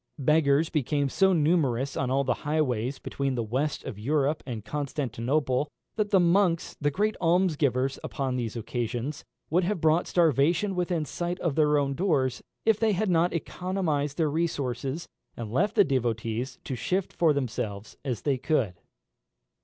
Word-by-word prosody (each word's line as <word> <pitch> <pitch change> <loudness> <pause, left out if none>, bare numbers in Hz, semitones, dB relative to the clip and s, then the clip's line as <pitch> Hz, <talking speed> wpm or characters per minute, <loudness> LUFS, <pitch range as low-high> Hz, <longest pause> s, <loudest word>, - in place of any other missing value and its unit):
Beggars 150 +1 +3
became 145 -1 0
so 190 +7 +3
numerous 145 -6 +2
on 130 - -1
all 135 +1 +2
the 130 -2 +1
highways 135 -4 0
between 135 -2 -2
the 120 - -1
west 130 +7 -2
of 105 - -7
Europe 145 +5 +1
and 115 -4 -5
Constantinople, 135 +1 -1 0.3
that 215 -2 0
the 195 - +5
monks, 175 -1 +2
the 145 - +3
great 210 +8 0
almsgivers 150 -7 +2
upon 135 -3 -2
these 120 -3 -3
occasions, 120 +5 -3 0.3
would 180 +3 +3
have 190 +1 -1
brought 160 +2 +3
starvation 170 - +2
within 175 -3 -1
sight 175 +4 -3
of 170 -5 0
their 150 0 +3
own 140 -1 +1
doors, 135 -7 0 0.2
if 220 -1 +3
they 220 -2 +3
had 195 +1 0
not 170 +1 +3
economised 165 -4 -2
their 155 -3 +1
resources, 145 -1 -2 0.3
and 115 -3 -5
left 195 +10 +1
the - - +7
devotees 120 -1 -1
to - - -5
shift 185 +9 -1
for 165 -3 +3
themselves 115 -7 -3
as 125 -6 -3
they 135 -3 +1
could. 115 - 0
145 Hz, 160 wpm, -27 LUFS, 130-170 Hz, 0.3 s, the